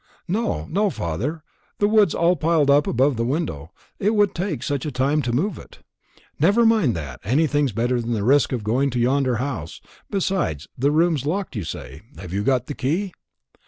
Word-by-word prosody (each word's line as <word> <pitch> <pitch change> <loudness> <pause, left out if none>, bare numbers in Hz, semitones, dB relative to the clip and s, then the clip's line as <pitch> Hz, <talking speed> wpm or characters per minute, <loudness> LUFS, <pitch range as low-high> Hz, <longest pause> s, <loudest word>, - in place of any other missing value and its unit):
"No, 175 - -1
no, 205 +3 +2
father. 120 - -3 0.3
The 205 - +2
wood's 210 -4 +4
all 170 +2 +3
piled 155 -3 +2
up 145 +1 +4
above 130 +1 +2
the 115 - 0
window. 120 - -2 0.3
It 210 +3 +1
would 205 -2 +3
take 185 +3 -3
such 140 -3 -2
a 150 - -3
time 140 +4 +1
to 125 - -2
move 160 - -1
it." - - -15 0.6
"Never 205 +10 +4
mind 215 - +3
that. 70 -7 -6
Anything's 145 - +1
better 120 +3 0
than 120 +1 -3
the 105 -3 -1
risk 140 +5 +3
of 125 -5 -2
going 120 +6 +1
into 130 -3 -1
yonder 130 +1 +2
house. 120 - -4 0.3
Besides, 185 - -1
the 140 +3 +1
room's 155 -2 +1
locked, 185 -2 -2
you 105 - -3
say. 70 -3 -7 0.2
Have 90 -2 -8
you 100 - 0
got 125 +1 +1
the 145 - -5
key?" 170 +9 -2
140 Hz, 195 wpm, -22 LUFS, 120-170 Hz, 0.6 s, wood's